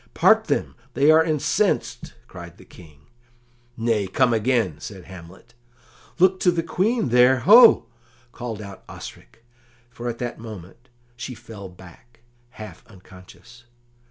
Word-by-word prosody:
"Part - - +4
them; - - -2 0.2
they 145 +3 +4
are 160 +1 +5
incensed!" 155 -3 -1
cried - - -12
the - - -17
King. 75 -5 -17 0.8
"Nay, 115 -3 0
come 120 +5 +1
again," 110 - 0
said 95 -3 -9
Hamlet. 95 +4 -14 0.6
"Look 185 +1 +3
to 180 - +2
the 170 -1 0
Queen 200 - -1
there, 125 +1 +4
ho!" 230 - +7 0.5
called 115 -3 -7
out 100 -2 -11
Osric, - - -12 0.5
for 120 0 -6
at 120 - -5
that 120 -1 -6
moment 110 +2 -12 0.3
she 120 +2 -7
fell 100 -5 -11
back, 95 +6 -18 0.3
half 110 -4 -12
unconscious. 110 +4 -17
115 Hz, 130 wpm, -22 LUFS, 95-130 Hz, 0.8 s, ho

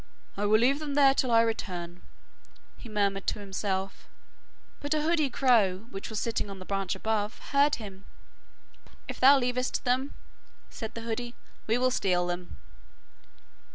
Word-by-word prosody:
'I 205 +1 -1
will 215 +1 +5
leave 270 +5 +3
them 295 -2 -4
there 275 -2 +6
till 260 -2 0
I 230 -1 +6
return,' 180 -6 -4 0.7
he 235 - -11
murmured 200 -2 0
to - - 0
himself, 195 -1 -3 0.7
but 290 +2 -1
a 300 - 0
hoodie 315 -3 +2
crow, 225 -7 +2
which 195 - -6
was 220 -2 -3
sitting 230 -3 -2
on 195 -1 -8
a 185 - -9
branch 195 -2 -2
above, 220 0 -2
heard 285 +1 +4
him. 195 -3 -10 1.0
'If - - -6
thou 275 +2 +8
leavest 250 0 -1
them,' 260 +2 0 0.6
said 220 -2 -7
the 230 - -5
hoodie, 235 +1 -4 0.3
'we 225 +2 +2
will 255 +1 +2
steal 180 -6 +1
them. 175 0 -5
225 Hz, 155 wpm, -28 LUFS, 195-255 Hz, 1.0 s, thou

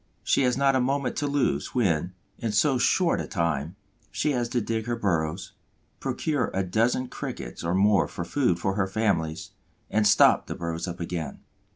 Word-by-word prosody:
She - - +2
has 125 -1 +2
not 135 -1 +3
a 130 - +3
moment 135 +1 0
to 145 - 0
lose, 135 - 0
when, 90 -7 +1 0.3
in 115 -2 -2
so 135 -1 +3
short 175 +6 +2
a - - -6
time, 85 -3 -1 0.3
she 150 +9 0
has 120 -3 -1
to 125 - 0
dig 110 0 -3
her 120 - 0
burrows, 85 -5 -1 0.5
procure 150 -5 -1
a 95 - +1
dozen 115 +7 +1
Crickets - - -6
or 85 +2 0
more 100 0 +4
for 85 - -6
food 120 -4 +1
for 95 +2 -1
her 95 -1 0
families, 95 -6 -1 0.4
and 105 -1 +3
stop 105 - +5
the - - -4
burrows 85 +1 -4
up 90 0 -6
again. 85 -4 -4
105 Hz, 185 wpm, -26 LUFS, 85-125 Hz, 0.5 s, stop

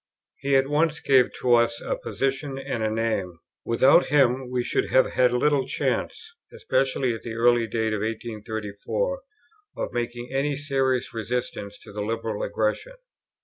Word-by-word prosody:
He 140 0 +1
at 135 0 +4
once 150 +2 +1
gave 130 -2 +4
to 125 -1 +3
us 115 0 +3
a - - -2
position 135 0 -2
and 135 -3 -4
a 110 - +1
name. 110 -6 -1 0.3
Without 130 +8 +4
him 130 -3 +2
we 125 -1 -1
should - - 0
have 130 - +4
had 125 -1 +3
little 135 +2 +2
chance, 445 - -2 0.2
especially 135 - 0
at 115 - -7
the 115 -1 -6
early 120 0 +3
date 110 -1 -1
of 105 - -1
1834, 110 - -3 0.6
of - - -3
making 120 0 -3
any 140 +1 0
serious 135 -3 0
resistance 115 -3 -4
to - - -12
the 105 +1 -5
Liberal 110 0 -3
aggression. 110 - -2
120 Hz, 155 wpm, -25 LUFS, 115-135 Hz, 0.6 s, at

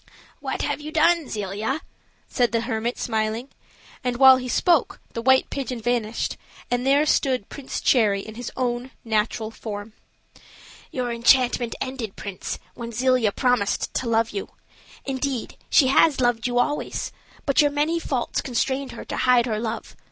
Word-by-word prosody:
"What - - -3
have - - -2
you 305 +1 -6
done, 325 -1 +3
Zelia?" 210 +7 -2 0.5
said 245 -2 +1
the 230 -1 +1
hermit, 235 0 -2
smiling; 220 +3 -2 0.5
and 250 -1 -1
while 265 0 +9
he 255 0 -5
spoke 335 +3 +2
the 230 - -3
white 260 +2 +4
pigeon 255 -3 -3
vanished, 235 -1 -1 0.3
and 245 +1 0
there 285 +2 +4
stood 260 -7 +1
Prince 275 -2 -5
Cherry 210 -6 +3
in 220 - -9
his 240 +1 -6
own 245 0 -1 0.2
natural 220 0 0
form. 210 -1 -7 1.0
"Your 250 -2 -2
enchantment 240 0 +3
ended, 255 -6 -4
prince, 200 -3 -5 0.2
when 235 -1 -7
Zelia 250 -2 +2
promised 245 -4 0
to 245 - -1
love 225 0 +2
you. 395 - -4 0.6
Indeed, 265 -2 -2
she 280 - +6
has 280 +1 +4
loved 240 -2 +2
you 245 0 -1
always, 290 +4 -1 0.3
but 275 0 +4
your 295 - +4
many 300 +4 0
faults 260 -7 -2
constrained 265 +2 -1
her - - -8
to - - -5
hide 250 -2 +4
her 220 -3 -1
love. 230 0 -4
245 Hz, 160 wpm, -24 LUFS, 225-265 Hz, 1.0 s, while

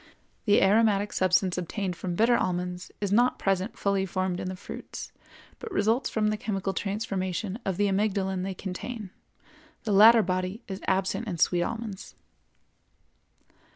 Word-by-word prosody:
The 205 -2 +5
aromatic 205 0 +3
substance 185 0 +2
obtained 180 +1 -3
from 180 -1 -4
bitter 230 +5 +4
almonds 180 -3 -2
is 200 -2 -2
not 245 +4 +3
present 195 +2 -1
fully 200 -1 +1
formed 185 0 -1
in 185 - -3
the 185 - -5
fruits, 185 - -8 0.5
but 455 - -7
results 225 +5 +1
from 215 -1 +1
the 215 - -1
chemical 195 -2 -2
transformation 195 0 -3
of 190 -2 -1
the 205 - +2
amygdalin 195 -1 0
they 190 0 -3
contain; 195 +3 -6 0.7
the 215 - 0
latter 220 +3 +8
body 185 +5 -2
is 190 -1 -6
absent 190 +4 0
in 180 -5 -3
sweet 175 +2 +3
almonds. 220 0 -5
195 Hz, 150 wpm, -27 LUFS, 185-215 Hz, 0.7 s, latter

